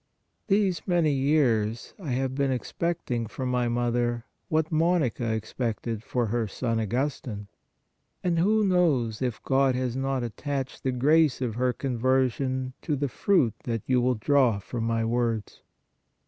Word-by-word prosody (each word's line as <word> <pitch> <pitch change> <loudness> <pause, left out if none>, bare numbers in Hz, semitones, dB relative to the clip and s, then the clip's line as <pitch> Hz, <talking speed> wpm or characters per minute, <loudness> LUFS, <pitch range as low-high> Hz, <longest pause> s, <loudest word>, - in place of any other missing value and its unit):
These 195 -4 +1
many 170 -4 +3
years 130 -6 +1
I 170 -7 -6
have 130 +1 -1
been 140 0 0
expecting 130 -3 -2
for 130 +4 -5
my 125 -1 +1
mother, 120 0 0 0.2
what 160 +1 +1
Monica 155 -8 +1
expected 110 0 -3
for 120 +1 -1
her 115 +1 -1
son 115 +3 -2
Augustine. 115 -2 -2 0.8
And 170 -2 +1
who 210 +4 +3
knows, 145 - +2
if 125 -3 -2
God 135 -1 +2
has 125 -1 -1
not 135 -1 -1
attached 135 +4 -4
the 130 - 0
grace 145 +3 +3
of 125 -4 -2
her 125 +2 +1
conversion 130 +1 0
to 155 - -1
the 140 0 -1
fruit 135 - +2
that 115 -3 -2
you 125 -1 +2
will 125 +1 +2
draw 125 -1 +3
from 115 +3 -4
my 115 0 0
words 115 -2 -1
130 Hz, 145 wpm, -27 LUFS, 115-145 Hz, 0.8 s, many